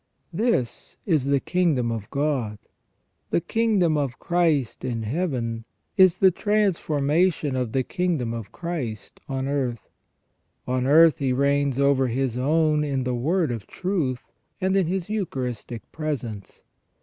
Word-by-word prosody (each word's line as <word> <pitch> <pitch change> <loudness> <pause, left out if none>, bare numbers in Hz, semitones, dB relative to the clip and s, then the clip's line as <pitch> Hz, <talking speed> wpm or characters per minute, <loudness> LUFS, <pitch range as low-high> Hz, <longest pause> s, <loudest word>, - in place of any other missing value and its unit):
'' - - -46
This 215 - -1
is 155 -9 +2
the 140 0 +3
kingdom 150 -9 +1
of 110 -3 -5
God. 140 -7 -1 0.7
The - - +2
kingdom 200 -5 +1
of 140 -4 -2
Christ 165 -8 0
in 120 -3 -2
Heaven 120 -4 -2 0.3
is 185 -3 +6
the 190 0 +5
transformation 170 - +1
of 125 -3 -1
the 130 +2 +1
kingdom 155 -8 -1
of 115 -4 -6
Christ 145 -12 -5
on 135 0 -2
earth. 130 -5 -2 0.8
On 130 0 0
earth 160 +2 +6
He 135 -2 0
reigns 140 0 +1
over 140 -1 +3
His 125 0 -1
own 150 +3 +2
in 135 -3 -1
the 125 0 -1
word 155 +5 +1
of 115 -4 -5
truth, 160 -10 -2 0.4
and 190 +1 +1
in 190 -4 +2
His 185 0 -2
Eucharistic 130 - -4
presence. 125 -10 -5
140 Hz, 140 wpm, -24 LUFS, 125-170 Hz, 0.8 s, is